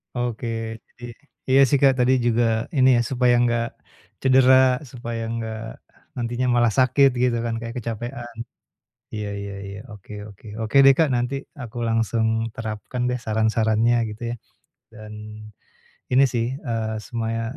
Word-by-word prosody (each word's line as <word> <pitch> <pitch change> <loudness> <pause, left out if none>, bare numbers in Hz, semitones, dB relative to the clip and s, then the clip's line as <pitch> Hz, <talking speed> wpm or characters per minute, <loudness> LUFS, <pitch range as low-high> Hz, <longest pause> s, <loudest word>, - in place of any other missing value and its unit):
Oke, 120 -1 -3 0.5
jadi 120 - -17 0.5
iya, 135 - +5
sih, 145 - +2
Kak, 135 -1 +6
tadi 125 +1 +4
juga 120 0 +2 0.3
ini 130 0 +5
ya 120 - +3
supaya 125 -1 +3
enggak 120 -1 +1 0.6
cedera, 130 -1 +5
supaya 120 -2 -5
enggak 110 -1 -4 0.6
nantinya 120 +1 -2
malah 120 -1 +3
sakit 130 +2 +5
gitu 120 -2 +2
kan 115 -1 -2
kayak 115 0 -7
kecapekan. 120 +1 -6 0.8
Iya 105 -1 -4
iya 100 0 -6
iya, 100 0 -8
oke 105 0 -13 0.2
oke. 100 +2 -15 0.2
Oke 110 - -3
deh, 135 0 +8
Kak, 160 - +4
nanti 125 +2 -1 0.3
aku 120 -2 -8
langsung 115 0 +1 0.3
terapkan 110 +2 -5
deh 125 0 -1
saran-sarannya 110 +1 +1
gitu 105 +3 -10
ya. - - -3 0.6
Dan 110 0 -10 1.0
ini 130 +2 +5
sih, 115 -1 0
eee, 115 -5 -3
semaya 115 0 -3
120 Hz, 145 wpm, -23 LUFS, 110-125 Hz, 1.0 s, deh